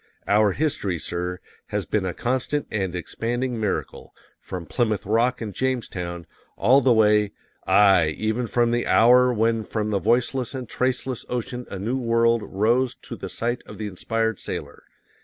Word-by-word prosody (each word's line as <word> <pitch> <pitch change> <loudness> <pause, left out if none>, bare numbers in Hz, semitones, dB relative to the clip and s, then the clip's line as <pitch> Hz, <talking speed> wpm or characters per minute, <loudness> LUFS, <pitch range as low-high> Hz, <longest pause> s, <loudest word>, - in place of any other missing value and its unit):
OUR 105 -1 +4
HISTORY, 120 - -1
SIR, 90 +2 -3 0.3
has - - -2
been 100 -3 -1
a 90 - -3
constant 130 +4 -1
and 95 -4 -2
expanding 120 +7 -3
miracle, 105 -3 -3 0.2
FROM 90 -2 -7
PLYMOUTH 110 -2 -1
ROCK 115 +4 +1
AND 105 -3 -5
JAMESTOWN, 95 -10 -3 0.3
all 130 +7 +5
the 130 - +4
way 105 -2 +4 0.3
aye, 95 -6 +5
even 110 +3 -1
from 120 +1 +2
the 120 0 0
hour 125 +3 +6
when 115 -1 +1
from 105 0 -3
the 100 - +1
voiceless 120 +4 +1
and 130 -2 -5
traceless 130 0 -1
ocean 125 0 -4
a 95 - -5
new 115 +8 -2
world 115 -1 +2
rose 120 +6 +1
to - - -7
the - - -7
sight 120 +1 -2
of - - -10
the 110 - -4
inspired 110 +2 -2
sailor. - - -7
115 Hz, 160 wpm, -24 LUFS, 100-125 Hz, 0.3 s, hour